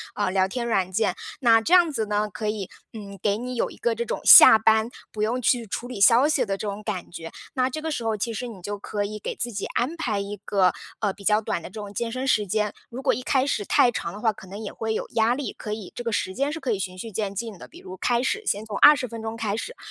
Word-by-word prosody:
呃， 205 Hz, -, 0 dB
聊 190 Hz, 0 st, +2 dB
天 235 Hz, +5 st, -4 dB
软 190 Hz, -5 st, 0 dB
件。 190 Hz, -1 st, 0 dB, 0.2 s
那 230 Hz, -4 st, +5 dB
这 330 Hz, -, 0 dB
样 350 Hz, -3 st, +6 dB
子 225 Hz, -6 st, -1 dB
呢， 210 Hz, 0 st, -1 dB
可 215 Hz, +3 st, -4 dB
以， 210 Hz, -3 st, -3 dB, 0.2 s
嗯， 200 Hz, -3 st, -9 dB
给 205 Hz, 0 st, +1 dB
你 250 Hz, +2 st, -5 dB
有 235 Hz, -, -1 dB
一 -, -, -12 dB
个 235 Hz, -1 st, 0 dB
这 235 Hz, +1 st, -3 dB
种 -, -, -4 dB
下 220 Hz, -, +10 dB
班 220 Hz, +1 st, +3 dB, 0.2 s
不 215 Hz, -, -3 dB
用 240 Hz, +4 st, 0 dB
去 240 Hz, 0 st, +2 dB
处 230 Hz, +4 st, -5 dB
理 245 Hz, -5 st, -7 dB
消 235 Hz, +7 st, +6 dB
息 280 Hz, -5 st, +1 dB
的 195 Hz, -2 st, -2 dB
这 210 Hz, -, -5 dB
种 205 Hz, +1 st, -5 dB
感 200 Hz, -5 st, -5 dB
觉。 165 Hz, -1 st, -8 dB, 0.2 s
那 255 Hz, -1 st, +2 dB
这 310 Hz, +4 st, -5 dB
个 320 Hz, -, -3 dB
时 245 Hz, -, -3 dB
候 225 Hz, -1 st, 0 dB
其 220 Hz, +3 st, -3 dB
实 245 Hz, +3 st, -4 dB
你 215 Hz, -6 st, -10 dB
就 205 Hz, +3 st, -5 dB
可 205 Hz, +1 st, -3 dB
以 210 Hz, +1 st, -5 dB
给 210 Hz, -, -5 dB
自 240 Hz, -, -3 dB
己 200 Hz, -2 st, -4 dB
安 260 Hz, +8 st, -1 dB
排 220 Hz, -10 st, -1 dB
一 200 Hz, +1 st, -5 dB
个， 190 Hz, -3 st, +3 dB, 0.3 s
呃， 205 Hz, -3 st, 0 dB
比 200 Hz, -, -15 dB
较 210 Hz, +2 st, +3 dB
短 190 Hz, -, -3 dB
的 -, -, -6 dB
这 -, -, -22 dB
种 205 Hz, -1 st, -8 dB
健 230 Hz, +2 st, -3 dB
身 255 Hz, +2 st, -3 dB
时 215 Hz, -5 st, +2 dB
间。 210 Hz, +2 st, 0 dB, 0.2 s
如 250 Hz, +2 st, -7 dB
果 275 Hz, -, +2 dB
一 255 Hz, -, -4 dB
开 265 Hz, 0 st, +2 dB
始 210 Hz, -7 st, -1 dB
太 245 Hz, -, +4 dB
长 170 Hz, -7 st, -4 dB
的 205 Hz, -, -8 dB
话， 225 Hz, -, +3 dB
可 190 Hz, -, -13 dB
能 195 Hz, +3 st, -8 dB
也 210 Hz, -, -5 dB
会 220 Hz, 0 st, -3 dB
有 -, -, -3 dB
压 225 Hz, +1 st, +3 dB
力， 280 Hz, 0 st, -4 dB
可 210 Hz, -, -6 dB
以 210 Hz, -3 st, -7 dB
这 240 Hz, -, -5 dB
个 230 Hz, -, -2 dB
时 190 Hz, -3 st, -1 dB
间 275 Hz, +3 st, 0 dB
是 325 Hz, -, -5 dB
可 260 Hz, -, -2 dB
以 210 Hz, -, 0 dB
循 185 Hz, -1 st, -4 dB
序 225 Hz, +4 st, -7 dB
渐 200 Hz, -1 st, -3 dB
进 220 Hz, -1 st, -5 dB
的。 -, -, -11 dB
比 340 Hz, -, -15 dB
如 185 Hz, -, -10 dB
开 240 Hz, +5 st, +1 dB
始 420 Hz, +11 st, -1 dB
先 205 Hz, -, -1 dB
从 210 Hz, -2 st, -5 dB
20 290 Hz, -3 st, +6 dB
分 230 Hz, -1 st, -8 dB
钟 220 Hz, 0 st, -5 dB
开 215 Hz, -3 st, -2 dB
始， -, -, -6 dB
220 Hz, 310 characters per minute, -24 LUFS, 205-245 Hz, 0.3 s, 下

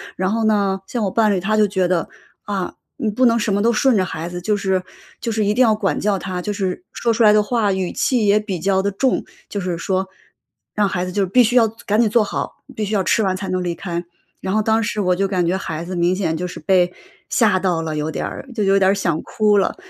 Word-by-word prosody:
然 185 Hz, +2 st, -1 dB
后 225 Hz, 0 st, 0 dB
呢， 200 Hz, -3 st, +2 dB
像 235 Hz, -3 st, -2 dB
我 195 Hz, -, 0 dB
伴 215 Hz, -1 st, +3 dB
侣， 190 Hz, -, +1 dB
他 215 Hz, +4 st, 0 dB
就 215 Hz, -1 st, +4 dB
觉 190 Hz, -2 st, 0 dB
得， 175 Hz, -3 st, 0 dB, 0.4 s
啊， 195 Hz, -3 st, -3 dB, 0.2 s
你 220 Hz, -, -1 dB
不 255 Hz, +5 st, +2 dB
能 230 Hz, 0 st, +3 dB
什 210 Hz, -2 st, 0 dB
么 200 Hz, -, +1 dB
都 235 Hz, +2 st, +3 dB
顺 260 Hz, +2 st, +3 dB
着 190 Hz, -, +3 dB
孩 165 Hz, -1 st, -5 dB
子， 175 Hz, 0 st, -6 dB
就 210 Hz, +4 st, +1 dB
是 190 Hz, -2 st, 0 dB, 0.4 s
就 230 Hz, -, -3 dB
是 215 Hz, -1 st, 0 dB
一 205 Hz, -, +2 dB
定 250 Hz, -, +1 dB
要 225 Hz, -3 st, +4 dB
管 205 Hz, -3 st, -1 dB
教 205 Hz, -1 st, +1 dB
他， 180 Hz, 0 st, -4 dB
就 210 Hz, -, -3 dB
是 195 Hz, -, -3 dB
说 235 Hz, -1 st, 0 dB
出 230 Hz, +1 st, +2 dB
来 210 Hz, -, +7 dB
的 210 Hz, -, +5 dB
话， 210 Hz, -1 st, 0 dB
语 190 Hz, -2 st, -2 dB
气 245 Hz, -5 st, +1 dB
也 205 Hz, +1 st, +5 dB
比 200 Hz, -5 st, -4 dB
较 190 Hz, +2 st, +1 dB
地 200 Hz, -, 0 dB
重。 255 Hz, +7 st, 0 dB, 0.3 s
就 205 Hz, -, -3 dB
是 180 Hz, -2 st, -2 dB
说， 190 Hz, +2 st, -1 dB, 0.7 s
让 210 Hz, -1 st, +2 dB
孩 180 Hz, -2 st, -2 dB
子 180 Hz, -, -5 dB
就 195 Hz, +1 st, +1 dB
必 245 Hz, +7 st, +5 dB
须 245 Hz, +3 st, 0 dB
要 235 Hz, -2 st, +6 dB, 0.2 s
赶 210 Hz, +2 st, +1 dB
紧 225 Hz, -, +3 dB
坐 230 Hz, 0 st, +3 dB
好， 205 Hz, -, -4 dB, 0.2 s
必 220 Hz, -, -2 dB
须 205 Hz, -, -4 dB
要 195 Hz, -, +2 dB
吃 220 Hz, -, +2 dB
完 190 Hz, -2 st, +1 dB
才 195 Hz, -, -5 dB
能 185 Hz, 0 st, -1 dB
离 175 Hz, -1 st, -1 dB
开。 170 Hz, -1 st, -4 dB, 0.4 s
然 190 Hz, -, -3 dB
后 215 Hz, -, +3 dB
当 220 Hz, +1 st, +2 dB
时 210 Hz, 0 st, -2 dB
我 180 Hz, -2 st, +2 dB
就 195 Hz, +1 st, 0 dB
感 185 Hz, -3 st, 0 dB
觉 180 Hz, -, +1 dB
孩 165 Hz, -4 st, -5 dB
子 185 Hz, +1 st, -5 dB
明 175 Hz, +1 st, +2 dB
显 170 Hz, -5 st, -1 dB
就 180 Hz, -, -3 dB
是 -, -, -8 dB
被 180 Hz, +2 st, +2 dB, 0.4 s
吓 210 Hz, -6 st, +3 dB
到 180 Hz, -3 st, 0 dB
了 160 Hz, -1 st, -3 dB
有 150 Hz, +1 st, -2 dB
点 -, -, -3 dB
儿， -, -, -7 dB
就 215 Hz, -, 0 dB
有 195 Hz, 0 st, +4 dB
点 190 Hz, 0 st, +4 dB
想 170 Hz, -5 st, -1 dB
哭 210 Hz, -1 st, +2 dB
了。 190 Hz, -, 0 dB
195 Hz, 290 characters per minute, -20 LUFS, 185-215 Hz, 0.7 s, 来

